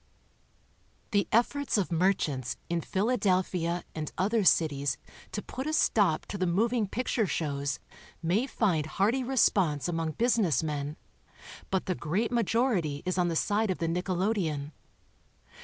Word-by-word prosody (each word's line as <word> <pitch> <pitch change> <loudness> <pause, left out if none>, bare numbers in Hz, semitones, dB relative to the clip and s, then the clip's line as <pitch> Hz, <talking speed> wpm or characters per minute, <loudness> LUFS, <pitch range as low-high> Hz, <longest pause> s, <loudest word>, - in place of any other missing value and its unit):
The 200 -4 +2
efforts 250 +3 +2
of 190 -3 0
merchants 160 -8 0
in 170 -1 +1
Philadelphia 185 -5 0
and 155 -1 -4
other 210 +3 +2
cities 140 -7 +3 0.3
to 210 - -4
put 260 +3 -5
a 310 - -1
stop 200 - +2
to 200 - -6
the 185 - +1
moving 220 +5 +1
picture 230 0 0
shows 140 -4 -2 0.4
may 190 +10 +1
find 175 - +1
hearty 220 +10 +1
response 195 - +2
among 165 -2 -2
business 220 - +2
men, 150 0 -3 0.7
but 190 -1 0
the 185 - 0
great 190 +9 -1
majority 225 - +1
is 185 0 -1
on 175 - +3
the 170 - -1
side 210 +5 +1
of 185 - 0
the 165 - -1
nickelodeon. 175 -4 -1
185 Hz, 140 wpm, -29 LUFS, 160-220 Hz, 0.7 s, cities